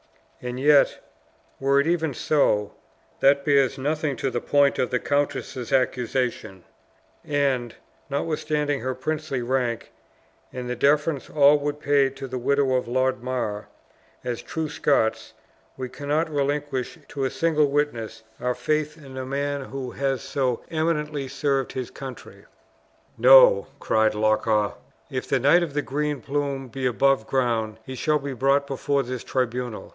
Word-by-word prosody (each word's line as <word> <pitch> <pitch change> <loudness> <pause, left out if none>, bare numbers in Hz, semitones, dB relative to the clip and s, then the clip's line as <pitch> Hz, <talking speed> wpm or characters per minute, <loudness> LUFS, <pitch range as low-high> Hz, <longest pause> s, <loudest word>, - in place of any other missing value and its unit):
And 125 0 -4
yet, 145 +1 +4 0.6
were 140 +1 +3
it 140 - +2
even 160 -4 0
so, 105 -10 +1 0.5
that 140 0 +4
bears 140 -2 +3
nothing 150 +1 -1
to 130 +2 -2
the 120 - -2
point 140 -1 +3
of 125 - +1
the 125 - +1
countess' 140 -3 -2
accusation; 125 -6 -1 0.6
and, 135 -5 0 0.3
notwithstanding 150 0 -1
her 130 0 -3
princely 145 -1 -3
rank, 120 -2 -1 0.6
and 125 -1 -6
the 125 - -2
deference 145 +2 +1
all 145 0 +5
would 145 0 -3
pay 140 -2 +3
to 135 0 -8
the 130 0 -4
widow 140 +1 +2
of 125 -1 0
Lord 130 +1 0
Mar, 120 -5 -3 0.6
as 120 -1 -3
true 160 -1 -4
Scots, 140 -6 0 0.4
we 130 -1 -4
cannot 150 +5 -2
relinquish 145 -1 -2
to 140 -2 -2
a - - +1
single 155 -1 +2
witness 140 -7 -2 0.2
our 125 0 -1
faith 150 0 -1
in 135 -4 -11
a 130 - -4
man 140 0 -2
who 130 -2 -6
has 135 -3 -2
so 130 -4 -1
eminently 150 -3 -1
served 135 -1 -1
his 130 -2 -4
country." 130 -2 -10 0.7
"No," - - +7
cried 110 -1 +2
Loch 110 +1 +1
awe; 105 -2 +2 0.4
"if 130 -1 -4
the 135 - +2
Knight 145 +7 +5
of 160 -5 -3
the 145 - 0
Green 150 +1 -2
Plume 140 0 -3
be 130 +2 -2
above 135 -1 +2
ground, 115 -4 0
he 130 - -7
shall 150 +4 +1
be 140 -1 -5
brought 135 +3 +2
before 140 0 -1
this 125 -1 -5
tribunal. 125 -2 -3
135 Hz, 150 wpm, -24 LUFS, 125-145 Hz, 0.7 s, No